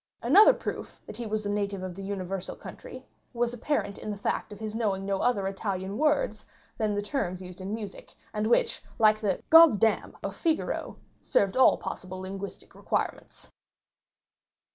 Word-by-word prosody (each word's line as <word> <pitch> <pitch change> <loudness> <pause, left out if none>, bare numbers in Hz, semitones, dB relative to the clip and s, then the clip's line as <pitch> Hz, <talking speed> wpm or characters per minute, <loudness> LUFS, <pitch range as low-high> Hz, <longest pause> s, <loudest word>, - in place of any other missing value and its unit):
Another 430 +4 +8
proof - - -6
that - - -9
he 235 -1 -4
was 215 0 -2
a - - -1
native 200 -2 -2
of 185 -1 -4
the 195 - -8
universal 195 -1 -4
country - - -10 0.3
was 240 0 0
apparent 245 -4 -2
in - - -6
the 205 - -3
fact 200 - -2
of 205 - -9
his 215 -1 -5
knowing 200 -4 -1
no 195 -1 -1
other 225 -6 +1
Italian 195 0 -3
words 290 -6 +1 0.4
than 215 -2 +1
the 205 - -1
terms 195 -7 -2
used 180 0 -10
in 190 +2 -5
music, 210 -3 -9 0.2
and 210 0 0
which 460 - +2 0.2
like 215 -1 +5
the 200 -4 -1
"goddam" 275 -10 +6
of - - -4
Figaro, 325 -2 -1 0.2
served 195 -1 +1
all 260 - +6
possible 185 0 -6
linguistic 195 +1 -7
requirements. - - -4
205 Hz, 165 wpm, -28 LUFS, 195-225 Hz, 0.4 s, Another